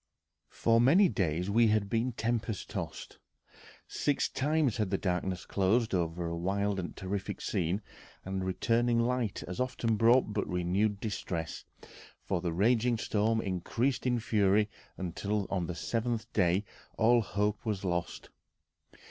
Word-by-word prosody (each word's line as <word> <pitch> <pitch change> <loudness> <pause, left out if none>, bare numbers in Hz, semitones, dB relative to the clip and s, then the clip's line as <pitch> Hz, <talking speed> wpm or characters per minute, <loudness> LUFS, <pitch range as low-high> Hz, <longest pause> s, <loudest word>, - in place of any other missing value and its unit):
For 115 0 +2
many 170 +10 +6
days 90 - -1
we 115 +2 +5
had 105 -1 +2
been 115 +4 0
tempest 115 -2 -2
tossed. - - -6 0.7
Six 145 - 0
times 145 -3 +1
had 105 -4 0
the 95 - +1
darkness 90 -1 -2
closed 110 +4 +1
over 85 -1 -1
a 85 0 -2
wild 100 +3 -1
and 85 - -5
terrific 95 0 -4
scene, 90 +5 -1 0.4
and 95 0 -3
returning 115 +5 +1
light 120 -3 0
as 90 - -6
often 125 -3 0
brought 115 0 +4
but 105 - -1
renewed 95 +4 0
distress, 95 -6 -4 0.6
for 90 -3 -1
the 85 -1 -1
raging 115 +6 +2
storm 110 +1 +1
increased 115 +9 -1
in 120 -1 +2
fury 105 -1 +2 0.3
until 100 +3 -2
on 90 -4 -1
the 90 - -4
seventh 115 +3 -2
day 95 +1 +2 0.3
all 120 +2 +5
hope 105 0 -1
was 105 -4 -2
lost. 85 -1 -3
105 Hz, 140 wpm, -31 LUFS, 95-115 Hz, 0.7 s, many